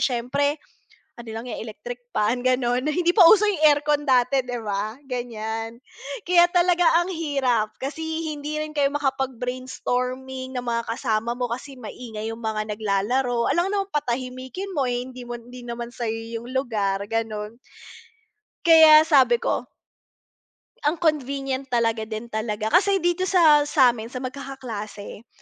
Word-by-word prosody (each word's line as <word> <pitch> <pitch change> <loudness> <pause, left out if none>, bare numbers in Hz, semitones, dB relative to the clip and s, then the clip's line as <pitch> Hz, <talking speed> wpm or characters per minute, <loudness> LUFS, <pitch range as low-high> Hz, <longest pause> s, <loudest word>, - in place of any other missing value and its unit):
siyempre, 280 +4 0 0.6
ano 235 -1 -12
lang 225 +1 -6
yan 250 - -6
electric 240 +3 -8
fan 230 +1 0
ganon, 255 +1 +1
hindi 345 +3 +2
pa 395 - +2
uso 425 -1 +6
yung 380 -7 +1
aircon 295 0 +2
dati 260 +1 +4
'di 245 -1 -4
ba, 210 +2 -3
ganiyan. 225 -3 -4 0.5
Kaya 350 0 +5
talaga 355 -1 +3 0.2
ang 375 - -5
hirap 270 -9 0
kasi 275 +4 -5 0.3
hindi 300 +1 -5
rin 305 0 -4
kayo 290 -2 +2
makapag 270 -3 -1
brainstorming, 255 +1 -4
na 245 - -3
mga 235 -1 -2
kasama 230 -1 -1
mo 245 -1 -2
kasi 265 +3 -7
maingay 225 -2 -7
yung 225 - -9
mga 220 -1 -2
naglalaro, 235 +4 0
alangan 360 +3 +1
naman 395 - -25
patahimikin 260 +6 -3
mo, 280 -7 0
eh, 245 0 -1
hindi 255 -1 -10
mo 240 - -4
hindi 245 +2 -12
naman 235 0 -5
sayo 230 -3 -3 0.2
yung 235 - -11
lugar, 215 -7 -1
ganon. 225 0 -3 1.1
Kaya 315 -2 +8
sabi 305 - +5
ko - - -2 1.2
Ang 305 - +2
convenient 275 -4 -1
talaga 230 -3 0
din 220 +2 -6
talaga, 215 0 -2
kasi 390 -1 +3
dito 350 +2 +1
sa 310 -6 +5
samin 245 -6 +3
sa 255 +2 -7
magkakaklase, 250 -5 -7
255 Hz, 145 wpm, -24 LUFS, 230-290 Hz, 1.2 s, Kaya